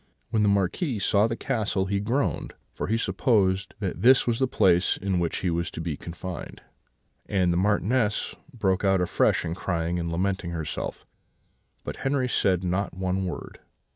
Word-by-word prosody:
"When 110 - +2
the 105 - +4
Marquis 100 - +1
saw 100 +1 +3
the 115 - -2
castle 110 -7 -1
he 100 +1 0
groaned, 120 +8 -1 0.2
for - - -4
he 110 - +1
supposed 95 -2 +1
that 95 -2 -3
this 125 +3 +6
was 120 -1 0
the 130 - +3
place 90 -6 +3
in 95 -2 -1
which 85 -1 -1
he 90 - 0
was 85 0 -1
to - - -8
be 80 -2 -2
confined; 85 +3 -7 0.7
and 90 -3 +2
the - - 0
Marchioness 105 +3 +1 0.2
broke 100 -7 0
out 95 -1 +3
afresh 90 - +2
in 80 - -2
crying 85 -1 -2
and 85 -1 -3
lamenting 95 +1 -1
herself; 80 -2 -4 0.8
but - - -6
Henri 135 -1 0
said 95 -6 +1
not 90 +2 -1
one 95 0 -1
word. 90 - -6
95 Hz, 170 wpm, -26 LUFS, 90-110 Hz, 0.8 s, this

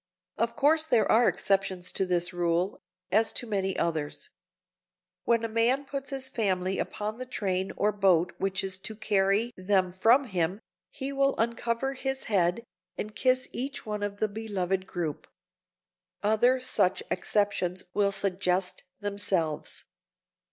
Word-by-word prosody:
Of 230 0 -1
course 310 +3 +4
there 240 -8 +3
are 235 +2 +5
exceptions 190 -2 0
to 190 - 0
this 175 0 0
rule, 175 +2 0 0.3
as 220 +3 +3
to - - -1
many 195 -4 -1
others. 165 - -2 0.9
When 230 -1 +2
a - - 0
man 235 +5 +2
puts 275 0 -5
his 270 -1 0
family 190 -6 0
upon 215 +2 -3
the 255 - -4
train 190 -6 -1
or 210 +1 +2
boat 185 -4 +3
which 195 0 -1
is 190 -1 -4
to 215 +3 -6
carry 205 +2 +2
them 185 -1 +1
from 225 +9 +4
him, 185 -4 -1 0.3
he 270 +1 -4
will 275 0 +2
uncover 235 +3 0
his 270 0 -3
head, 185 +1 +1 0.3
and 215 0 -5
kiss 255 0 +2
each 270 +3 -4
one 210 -1 -3
of 205 0 -3
the 215 - +1
beloved 195 -3 -2
group. 165 -6 -4 1.0
Other 230 +5 +4
such 190 -7 +1
exceptions 185 -2 0
will 200 -1 +2
suggest 185 -2 0 0.2
themselves. 190 -6 -2
205 Hz, 145 wpm, -28 LUFS, 185-235 Hz, 1.0 s, are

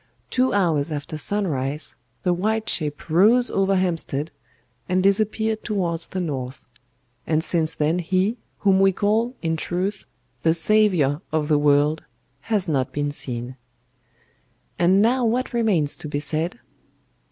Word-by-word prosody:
Two 255 0 +2
hours 165 -6 +1
after 145 +1 -5
sunrise 150 -5 -1 0.3
the 180 - +2
white 215 +5 -1
ship 150 -3 -3
rose 215 +10 +4
over 195 0 +2
Hampstead 165 -5 -1 0.6
and 185 0 +2
disappeared 215 +2 +1
towards 175 -6 -1
the 190 - -4
North; 135 -6 -4 0.6
and 160 0 +1
since 165 -2 +1
then 155 +4 +1
he, 185 +6 0 0.2
whom 195 -2 +4
we 195 0 +5
call, 220 +6 0
in 165 -1 0
truth, 185 +5 -3 0.4
the 160 0 +3
Saviour 170 -6 +3
of 155 -1 -1
the 150 -1 +4
world, 145 +1 +2 0.5
has 205 -4 +1
not 135 -5 0
been 145 0 -2
seen. 125 -2 -5 1.2
"And 185 +4 +4
now 250 +3 +2
what 245 +3 0
remains 200 -11 +1
to - - -7
be 145 -1 -2
said? 155 - -2
175 Hz, 140 wpm, -23 LUFS, 150-205 Hz, 1.2 s, we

